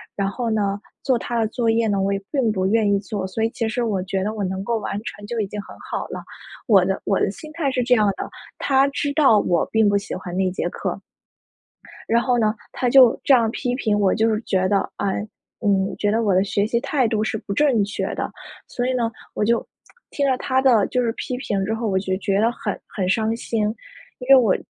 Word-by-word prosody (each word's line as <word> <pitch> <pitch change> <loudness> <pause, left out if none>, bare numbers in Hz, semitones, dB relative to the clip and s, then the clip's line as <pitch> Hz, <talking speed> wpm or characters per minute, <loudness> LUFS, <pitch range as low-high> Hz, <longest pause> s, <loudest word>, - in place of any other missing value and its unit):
然 195 -1 0
后 230 +3 -3
呢 205 -2 0 0.2
做 260 -3 +2
它 240 - -3
的 220 - +2
作 230 -1 0
业 225 0 +2
呢， 200 -2 +1
我 195 +1 +1
也 195 - -2
并 265 -6 +1
不 185 -2 -1
愿 215 0 +2
意 - - +3
做。 200 -2 -4
所 220 +4 -3
以 225 - +2
其 230 -1 -3
实 240 +2 -1
我 200 -5 0
觉 190 0 -2
得 215 +2 -2
我 210 - -5
能 190 +1 -3
够 230 +2 0
完 205 - -4
成 205 -3 -7
就 235 - -4
已 200 - -2
经 210 +2 -6
很 - - -12
好 - - -5
了， - - -7 0.4
我 195 -5 +6
的 190 0 -1
我 195 - +1
的 - - +2
心 310 +9 -11
态 315 -5 0
是 250 -2 0
这 250 0 +4
样 215 -2 +3
的。 - - -5 0.3
他 270 0 +3
知 285 +1 -2
道 270 -9 +5
我 175 -4 +1
并 220 -2 +4
不 205 - +3
喜 200 - -5
欢 185 -1 -7
那 190 -1 +2
节 - - -2
课。 - - -4 1.1
然 235 +1 +4
后 245 -1 +1
呢， 215 -2 +2 0.2
他 250 - -1
就 255 -2 +6
这 275 - +5
样 230 -3 +4
批 250 -1 -2
评 215 -5 0
我， 195 -2 +3
就 225 +1 +2
是 215 -1 +1
觉 185 -1 +1
得， 200 -1 +1
唉， 200 +1 -2 0.3
嗯， 195 -2 +1
觉 205 - +1
得 225 +2 +1
我 200 -3 +2
的 185 - +4
学 200 0 0
习 235 +1 +1
态 265 -5 +1
度 215 -1 0
是 220 - -1
不 200 -1 -5
正 250 -4 +3
确 200 - -3
的。 - - -3 0.4
所 245 0 -2
以 260 - 0
呢， 235 -2 0 0.2
我 - - -1
就 230 +2 +1 0.5
听 280 -1 0
了 260 - +2
他 260 0 +1
的 235 -7 +4
就 250 - 0
是 230 -2 +1
批 250 - -4
评 200 -6 -2
之 220 - -1
后， 225 0 -2
我 190 - +1
就 190 -1 -1
觉 195 0 0
得 230 +2 +3
很 - - -4
很 190 -3 -3
伤 220 +2 +1
心。 230 -1 -2 0.6
因 250 - -8
为 275 - +10
我 230 -7 +4
220 Hz, 265 characters per minute, -22 LUFS, 200-245 Hz, 1.1 s, 为